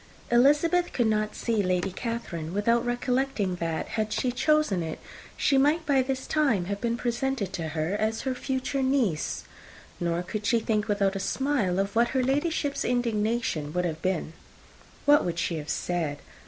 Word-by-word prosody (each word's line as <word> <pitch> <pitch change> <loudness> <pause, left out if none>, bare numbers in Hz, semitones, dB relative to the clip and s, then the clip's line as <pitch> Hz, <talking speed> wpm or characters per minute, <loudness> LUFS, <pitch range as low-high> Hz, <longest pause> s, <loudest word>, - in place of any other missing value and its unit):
Elizabeth 295 +8 +4
could 240 - +2
not 215 -1 0
see 225 -3 0
Lady 185 0 0
Catherine 185 -7 -4
without 230 +3 +2
recollecting 245 -5 0
that, 165 -2 -2
had 215 -1 -2
she 250 - 0
chosen 305 - +2
it, 160 -1 -4 0.4
she 275 -2 +3
might 305 +4 +3
by 275 -2 +3
this 260 0 -2
time 270 - +1
have 200 +2 -4
been 235 0 0
presented 240 -4 -1
to 165 -4 -3
her 155 +4 0
as 215 +2 0
her 265 - -1
future 265 +1 -2
niece; 260 - 0 0.6
nor 170 0 -1
could 210 +3 -4
she 235 - +4
think, 215 -1 0
without 200 -2 +1
a - - -2
smile, 225 -3 0
of 195 +2 -1
what 235 +1 +4
her 255 - +3
Ladyship's 285 +1 0
indignation 230 -9 0
would 180 0 0
have 160 -2 -3
been. 185 -4 -1 0.7
"What 290 0 +6
would 170 -1 -2
she 170 -1 -1
have 150 -1 -6
said? 165 -5 -1
225 Hz, 170 wpm, -27 LUFS, 185-265 Hz, 0.7 s, What